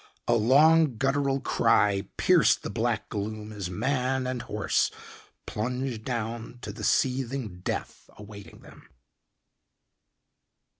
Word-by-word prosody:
A 120 Hz, -, +3 dB
long, 140 Hz, +4 st, +4 dB
guttural 135 Hz, +2 st, +1 dB
cry 100 Hz, -6 st, +2 dB
pierced -, -, +4 dB
the -, -, -4 dB
black -, -, -1 dB
gloom 110 Hz, +1 st, -5 dB
as 100 Hz, -4 st, -5 dB
man 130 Hz, +6 st, -1 dB
and 125 Hz, -1 st, -3 dB
horse 105 Hz, -3 st, 0 dB, 0.6 s
plunged 125 Hz, +1 st, -3 dB
down 115 Hz, -1 st, -4 dB
to -, -, -5 dB
the 110 Hz, 0 st, -9 dB
seething 125 Hz, -5 st, 0 dB
death 90 Hz, -, -5 dB
awaiting 100 Hz, -1 st, -12 dB
them. -, -, -16 dB
120 Hz, 110 wpm, -27 LUFS, 105-135 Hz, 0.6 s, long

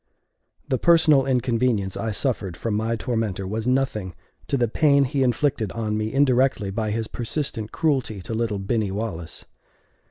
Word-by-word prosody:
The 130 Hz, -2 st, 0 dB
personal 160 Hz, -5 st, +5 dB
inconvenience 120 Hz, -6 st, +1 dB
I 115 Hz, -, -2 dB
suffered 105 Hz, -6 st, -2 dB
from 115 Hz, -, -2 dB
my 110 Hz, +2 st, 0 dB
tormentor 110 Hz, -4 st, -2 dB
was 110 Hz, +4 st, -3 dB
nothing 120 Hz, -9 st, 0 dB, 0.3 s
to 140 Hz, -, 0 dB
the 120 Hz, -2 st, +2 dB
pain 140 Hz, +4 st, +4 dB
he 135 Hz, +1 st, -1 dB
inflicted 125 Hz, -4 st, +1 dB
on 110 Hz, -2 st, -2 dB
me 110 Hz, 0 st, -2 dB
indirectly 130 Hz, -6 st, +2 dB
by 110 Hz, +2 st, -2 dB
his 110 Hz, +1 st, -2 dB
persistent 115 Hz, -3 st, -4 dB
cruelty 135 Hz, -9 st, 0 dB
to 115 Hz, -, -5 dB
little 110 Hz, -2 st, -1 dB
Binny 105 Hz, +1 st, -1 dB
Wallace. 95 Hz, -5 st, -5 dB
115 Hz, 155 wpm, -24 LUFS, 105-130 Hz, 0.3 s, personal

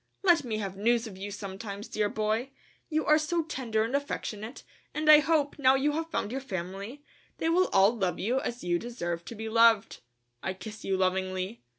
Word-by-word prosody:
Let 350 Hz, -4 st, +5 dB
me 225 Hz, -4 st, -3 dB
have 195 Hz, -3 st, -4 dB
news 230 Hz, +4 st, +2 dB
of 215 Hz, -4 st, -8 dB
you 195 Hz, +2 st, -6 dB
sometimes, 200 Hz, +1 st, -7 dB
dear 210 Hz, -1 st, 0 dB
boy, 220 Hz, +5 st, -1 dB, 0.4 s
you 310 Hz, -1 st, 0 dB
are 305 Hz, +1 st, +5 dB
so 330 Hz, +2 st, 0 dB
tender 245 Hz, -8 st, -1 dB
and 230 Hz, +5 st, -2 dB
affectionate, 235 Hz, -4 st, -4 dB, 0.3 s
and 305 Hz, 0 st, -2 dB
I 305 Hz, -1 st, +10 dB
hope, 300 Hz, -2 st, +1 dB
now 260 Hz, -1 st, +5 dB
you 280 Hz, +2 st, +2 dB
have 320 Hz, +2 st, -3 dB
found 220 Hz, -9 st, -2 dB
your 270 Hz, +2 st, -3 dB
family, 200 Hz, +4 st, -6 dB, 0.3 s
they 325 Hz, -, 0 dB
will 365 Hz, +3 st, +3 dB
all 195 Hz, +4 st, +5 dB
love 190 Hz, -5 st, -1 dB
you 245 Hz, +7 st, 0 dB
as 240 Hz, +1 st, -4 dB
you 175 Hz, -1 st, +1 dB
deserve 175 Hz, -8 st, -4 dB
to 235 Hz, -, -8 dB
be 220 Hz, +1 st, -5 dB
loved. 225 Hz, -1 st, +4 dB, 0.4 s
I 190 Hz, -, -3 dB
kiss 215 Hz, +2 st, -9 dB
you 190 Hz, -1 st, 0 dB
lovingly. 185 Hz, +2 st, -1 dB
225 Hz, 200 wpm, -29 LUFS, 195-280 Hz, 0.4 s, I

